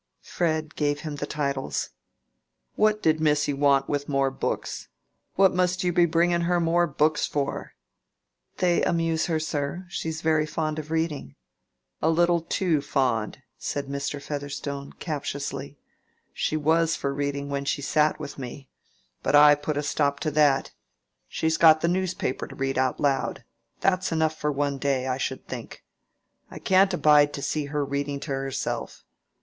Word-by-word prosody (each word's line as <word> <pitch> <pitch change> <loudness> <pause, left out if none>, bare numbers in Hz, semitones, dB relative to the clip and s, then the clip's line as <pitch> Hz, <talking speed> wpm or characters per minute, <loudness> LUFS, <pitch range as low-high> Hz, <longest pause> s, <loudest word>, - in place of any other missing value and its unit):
Fred 155 -2 -1
gave 145 -1 0
him 150 -2 -5
the 145 - -4
titles. 140 -3 -2 0.8
"What 215 0 +2
did 155 0 +3
missy 150 -2 +2
want 140 -1 +3
with 145 0 -2
more 135 -1 +1
books? 135 - -3 0.5
What 190 -1 +5
must 180 +1 +1
you 180 -1 +1
be 175 0 +4
bringing 170 +1 +2
her 175 +1 +1
more 170 +1 +2
books 150 +1 +1
for?" 140 -1 -3 0.8
"They 175 -2 +2
amuse 165 -1 +1
her, 160 -2 0
sir. 155 +3 -3
She 165 - -3
is 160 0 -5
very 155 -1 +2
fond 155 0 -2
of 155 0 -7
reading." 160 - -2 0.7
"A 160 - +3
little 170 +1 +3
too 165 -2 0
fond," 130 -3 -1 0.2
said 145 -1 -3
Mr. 140 +1 -3
Featherstone, 140 -1 -5
captiously. 140 -2 -5 0.6
"She 155 - -1
was 160 +2 +2
for 140 - -2
reading 140 0 -3
when 140 0 -2
she 145 - -1
sat 150 +2 +2
with 145 -2 -7
me. 135 +1 -8 0.5
But - - +1
I 145 0 +9
put 145 0 -2
a 145 - -1
stop 140 -1 0
to 155 - -1
that. 145 -2 +3 0.6
She's 160 0 0
got 160 -1 +6
the - - +2
newspaper 180 -6 -1
to - - -11
read 135 -1 -1
out 130 -1 0
loud. 140 -2 0 0.4
That's 185 -1 +1
enough 160 -1 +1
for 150 -1 -1
one 140 -1 -1
day, 135 -2 0
I 130 0 -1
should - - -4
think. - - -8 0.7
I - - -9
can't 190 +1 +4
abide 150 -4 +4
to 140 - -5
see 150 0 -1
her 145 0 -2
reading 140 0 -2
to 150 - -6
herself. 135 0 -3
150 Hz, 165 wpm, -26 LUFS, 140-165 Hz, 0.8 s, I